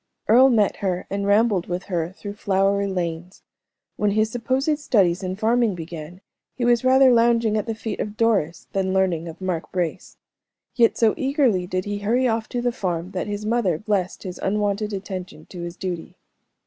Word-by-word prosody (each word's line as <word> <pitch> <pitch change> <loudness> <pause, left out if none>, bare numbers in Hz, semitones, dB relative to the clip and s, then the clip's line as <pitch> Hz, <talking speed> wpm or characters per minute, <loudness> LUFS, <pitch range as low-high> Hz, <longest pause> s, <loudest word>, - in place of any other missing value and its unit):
Earle 255 +5 +7
met 215 -5 +2
her 185 -2 -2
and 200 0 -2
rambled 205 -3 +3
with 180 +1 -3
her 170 -3 -2
through 205 +1 -7
flowery 200 0 +1
lanes. 180 -1 -4 0.5
When 210 - +1
his 215 +2 +1
supposed 265 +6 0
studies 195 - +2
in 185 -1 -3
farming 225 0 +2
began, 170 +1 -8 0.3
he 245 - -1
was 240 0 +3
rather 260 0 +6
lounging 230 -2 +3
at 215 +2 -1
the 225 - -2
feet 220 -1 -5
of 210 0 -4
Doris 200 -8 +1
than 190 -1 0
learning 175 -3 +1
of 165 - -9
Mark 185 -3 -3
Brace; 175 -3 -3 0.6
yet 235 -2 +3
so 225 -2 +4
eagerly 265 - +1
did 185 0 -2
he 205 0 -3
hurry 240 +5 +1
off 225 -1 -1
to 240 -1 -3
the 245 - +1
farm, 180 -6 -3
that 185 0 -3
his 205 0 -4
mother 215 -7 +1
blessed 200 -2 -2
his 180 -3 -7
unwonted 210 +1 -1
attention 185 -5 -6
to 180 - -7
his 170 0 -6
duty. 180 -3 -5
200 Hz, 185 wpm, -23 LUFS, 180-230 Hz, 0.6 s, Earle